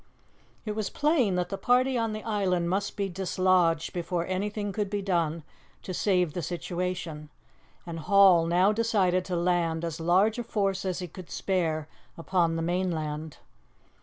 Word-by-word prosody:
It 215 - -2
was 210 -1 -2
plain 280 - +2
that 180 0 -1
the 195 - -4
party 255 +2 +3
on 225 -2 0
the 215 0 -5
island 185 -5 0
must 200 +2 -2
be 200 -1 0
dislodged 185 -3 +1
before 175 0 -2
anything 205 +2 -2
could 205 -1 -2
be 205 -1 -2
done 170 -4 0 0.4
to 185 - -5
save 180 -4 +1
the 175 - -3
situation, 175 -2 -4 0.6
and 165 -1 -6
Hall 185 -1 +5
now 180 +4 +4
decided 205 -5 +1
to 180 - -3
land 170 -1 0
as 165 0 -4
large 190 +7 +3
a - - -2
force 195 -4 -1
as 185 -2 -1
he 180 -1 -4
could 180 +1 -11
spare 160 -5 -1 0.3
upon 170 -1 +1
the 165 - -2
mainland. 160 -4 -2
185 Hz, 165 wpm, -28 LUFS, 170-200 Hz, 0.6 s, Hall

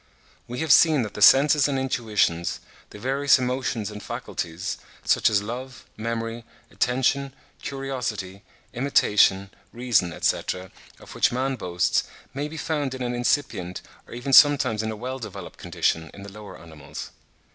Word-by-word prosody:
We 125 +1 -5
have 160 -2 +1
seen 155 -3 +6
that 105 - -6
the - - -7
senses 140 +6 +6
and 140 -2 -1
intuitions, 110 -10 0 0.3
the - - -11
various 135 +5 +3
emotions 125 -4 -2
and 105 0 -8
faculties, 85 -3 -5 0.2
such - - +3
as 100 -2 +1
love, 125 +3 -7
memory, 115 +1 -4 0.3
attention, 130 +2 0 0.3
curiosity, 125 -9 -4 0.3
imitation, 105 -7 +3 0.2
reason, 115 -7 +1
etc., 90 +3 -2 0.3
of - - -13
which - - +2
man 130 +2 -1
boasts, 90 -6 0 0.3
may 145 +2 -3
be 160 +2 -9
found 145 -4 -2
in 130 - -5
an 120 0 -2
incipient, 120 -8 -1 0.2
or - - -9
even 130 +3 -4
sometimes 130 -7 +6
in 110 - -3
a 110 - -4
well 130 +4 -5
developed 115 - -9
condition, 80 0 -1
in 100 - -10
the 100 - -10
lower 105 0 -11
animals. 80 -3 -10
120 Hz, 150 wpm, -24 LUFS, 105-135 Hz, 0.3 s, seen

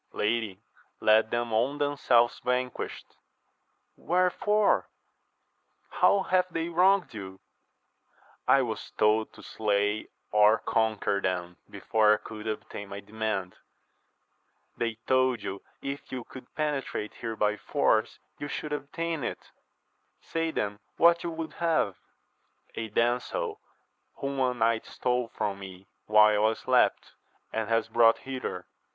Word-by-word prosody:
Lady, 110 -3 -1 0.4
let 110 +1 +4
them 120 -1 -1
own 130 +6 +1
themselves 135 -5 +2
vanquished.— 125 0 -3 0.8
rWherefore? 185 +4 +2 1.1
how 200 -1 +4
have 185 0 +1
they 165 0 -2
wronged 185 +1 +3
you? 95 -3 -8 0.5
— - - -33
I - - +3
was - - -5
told 110 +1 +3
to - - -14
slay 105 0 0 0.2
or 105 +1 +6
con 110 -1 0
quer 100 0 0
them 90 -2 -2
before 105 -1 +3
I - - -4
could 110 +1 -9
obtain 105 -2 -5
my 100 0 -6
demand. 105 -3 -3 0.6
— - - -39
^They 115 -2 -1
told 130 -3 +2
you 95 - -5 0.2
if 140 +1 -5
you 125 -2 -4
could 125 +1 -12
penetrate 145 -8 -2
here 115 -1 -5
by 105 -1 +1
force 110 -6 +1 0.2
you 145 - -4
should 150 +1 -4
obtain 165 +1 -3
it: - - -5 0.7
say 165 0 -2
then 105 -9 -2 0.2
what 170 0 +5
you 170 - -2
would 165 -1 -5
have. 160 - +2 0.4
— - - -31
^A 110 -1 -4
damsel, 420 - 0 0.5
whom 140 -1 -3
a 125 -1 +1
knight 115 -1 +1
stole 125 -1 -1
from 100 -3 -3
me 95 -1 -10 0.2
while 105 0 +5
I 110 - +2
slept, - - +1 0.4
and 110 -2 -2
has 115 0 +2
brought 115 -1 +5
hither. 130 -9 -5
115 Hz, 135 wpm, -28 LUFS, 105-145 Hz, 1.1 s, or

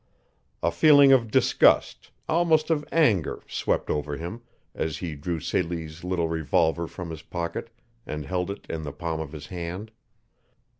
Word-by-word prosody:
A 85 - +3
feeling 145 - +7
of 120 -4 +4
disgust, - - +3 0.2
almost 160 -1 +2
of 150 -2 +1
anger, 115 - +2
swept - - -1
over 75 -1 -2
him 90 +8 -6 0.3
as 80 -2 -2
he 85 -4 -4
drew 80 +3 -3
Celie's 80 -1 -3
little 90 -2 0
revolver 80 +1 +1
from 85 0 -7
his 80 -1 -7
pocket 85 +7 -4 0.4
and 75 -1 -4
held 90 +6 -2
it 100 - -6
in 80 - -4
the 75 -2 -6
palm 85 -2 -3
of 80 -2 -5
his 75 -3 -8
hand. 90 +4 -6
85 Hz, 155 wpm, -26 LUFS, 80-105 Hz, 0.4 s, feeling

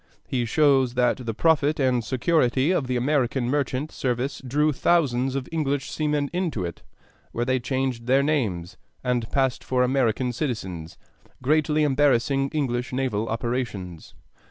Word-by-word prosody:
He 125 -2 -1
shows 135 -1 +3
that 125 0 +2
the 115 - -1
profit 155 0 +2
and 130 -3 +2
security 130 +3 +1
of 150 -8 0
the 125 - -1
American 130 -1 +1
merchant 145 +1 -1
service 130 +2 -2
drew 150 +4 +1
thousands 135 -4 +1
of 135 -2 -3
English 145 -4 -1
seamen 150 -2 0
into 170 - -1
it, 85 - -7 0.5
where 120 - -1
they 130 0 +1
changed 130 -1 -2
their 135 +2 +4
names 105 - -1 0.3
and 125 -3 -1
passed 135 -2 0
for 125 -1 +1
American 125 -1 +1
citizens, 95 - -4 0.5
greatly 155 +2 +2
embarrassing 135 -1 +2
English 130 -4 -2
naval 125 -4 -1
operations. 115 -8 -4
130 Hz, 140 wpm, -24 LUFS, 120-145 Hz, 0.5 s, their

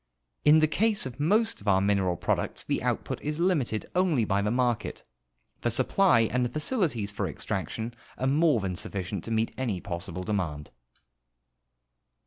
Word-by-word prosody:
In 155 +1 +6
the 155 - +5
case 210 +4 +1
of 130 +1 -7
most 215 - +2
of 105 - -12
our 95 -1 +5
mineral 95 -2 +1
products - - -1
the - - -1
output - - -2
is 150 +1 -3
limited 150 - +1
only 175 -10 +2
by 100 0 +1
the 105 - 0
market. 120 0 -1 0.6
The 120 - +1
supply 130 - +3
and 125 +3 +1
the 120 - 0
facilities 150 - -1
for 105 -2 -2
extraction 110 +8 -4 0.2
are 130 - -2
more 145 -1 +3
than 95 -2 -2
sufficient 95 0 -4
to - - -6
meet 110 0 0
any 115 -8 -1
l^ossible 90 0 -5
demand. 80 -9 -2
115 Hz, 160 wpm, -28 LUFS, 100-150 Hz, 0.6 s, In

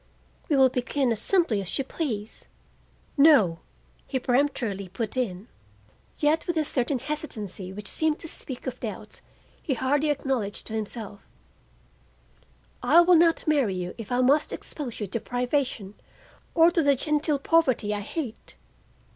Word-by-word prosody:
We 300 - +3
will 265 -1 +6
begin 250 +1 0
as 225 -1 -1
simply 330 - +2
as 185 - -4
you 275 - 0
please—" 240 -7 -5 0.7
"No," 275 - +5 0.5
he 270 - -1
peremptorily 245 -7 0
put 215 +5 -3
in, 215 -5 -2 0.7
yet 310 +2 +1
with 345 -2 -1
a 310 - +1
certain 260 0 0
hesitancy 220 - -3
which 200 +1 -7
seemed 315 +5 +1
to 330 - -7
speak 260 -4 -8
of 255 -1 -5
doubts 210 -2 -7 0.4
he 275 - -1
hardly 285 +5 +1
acknowledged 260 -8 -2
to 220 - -6
himself, 215 -1 -5 1.6
"I 340 - +6
will 355 +1 +5
not 330 -1 +4
marry 275 -11 +2
you 180 -1 -4
if 225 -1 -8
I 245 +1 +2
must 285 +4 +3
expose 270 -7 -5
you 210 - -2
to 200 +4 -3
privation 245 -4 -2 0.6
or 335 0 +6
to 340 - +2
the 285 -2 +4
genteel 300 +2 0
poverty 265 -8 +2
I 205 - -3
hate. 235 +2 -6
255 Hz, 150 wpm, -26 LUFS, 210-300 Hz, 1.6 s, will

